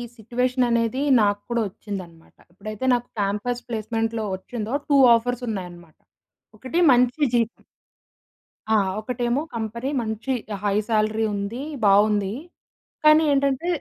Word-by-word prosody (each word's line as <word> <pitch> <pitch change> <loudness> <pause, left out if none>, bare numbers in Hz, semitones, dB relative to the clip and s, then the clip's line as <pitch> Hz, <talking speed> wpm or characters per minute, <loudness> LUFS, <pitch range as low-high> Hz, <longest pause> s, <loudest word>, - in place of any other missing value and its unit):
Situation 250 +3 0
అనేది 235 +2 0 0.2
నాకు 205 0 +2
కూడా 235 -1 0
వచ్చిందన్నమాట. 185 -4 -9 0.2
ఎప్పుడైతే 215 +6 -6
నాకు 245 0 -1
క్యాంపస్ 210 +5 -2
ప్లేస్మెంట్‌లో 225 0 -2
వచ్చిందో 220 +4 -6
2 285 - +4 0.2
ఆఫర్స్ 245 +2 -2
ఉన్నాయన్నమాట. 175 -5 -7 0.6
ఒకటి, 260 +10 -2
మంచి 250 +4 +2
జీ 240 - +4 1.4
ఆ! - - +5 0.2
ఒకటేమో, 240 +3 -1
కంపెనీ 230 +3 -3
మంచి 220 +3 -4 0.3
హై 205 - +1
సాలరీ 220 0 +1
ఉంది, 200 +5 -4 0.2
బాగుంది. 205 0 +3 0.7
కానీ 305 +1 +6
ఏంటంటే 275 +3 +1
225 Hz, 115 wpm, -23 LUFS, 205-245 Hz, 1.4 s, కానీ